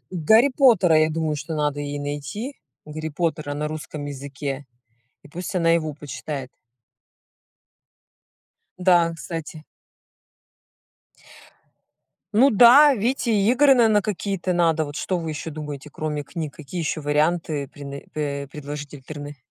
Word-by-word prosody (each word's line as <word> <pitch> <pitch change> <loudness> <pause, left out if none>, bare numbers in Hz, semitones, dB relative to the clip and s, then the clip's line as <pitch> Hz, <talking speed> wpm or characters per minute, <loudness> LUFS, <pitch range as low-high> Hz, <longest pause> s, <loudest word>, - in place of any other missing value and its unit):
."Гарри 220 - +4
Поттера", 195 - +5
я 155 0 +3
думаю, 155 -1 -1
что 160 +2 -5
надо 145 -1 -1
ей 145 0 -4
найти. 145 - -5 0.3
"Гарри 155 +1 -5
Поттера" 155 -2 -2
на 150 +1 -2
русском 150 -1 -6
языке. 140 0 -6 0.6
И - - -14
пусть 180 +5 -6
она 165 -1 +3
его 155 -3 +1
почитает. 140 -1 -6 2.3
Да, 175 -2 +4
кстати. 160 -1 -7 2.7
Ну 255 +7 +5
да, 250 +7 +8
видите, 235 +2 0
и 205 0 +2
игры, 270 +1 +6
наверно, 220 -4 +4
какие-то 195 -2 -2
надо. 165 -2 +2
Вот 145 +1 -8
что 185 - -1
вы 165 -1 -4
ещё 155 +1 -5
думаете, 150 -1 -7
кроме 150 -1 -3
книг? 155 -1 -6
Какие 160 +4 -6
ещё 155 0 -2
варианты 150 -1 0
прены 140 -1 -9
пэ 140 -2 -3
предложить 145 0 -7
альтерны 145 +1 -8
155 Hz, 130 wpm, -23 LUFS, 145-180 Hz, 2.7 s, да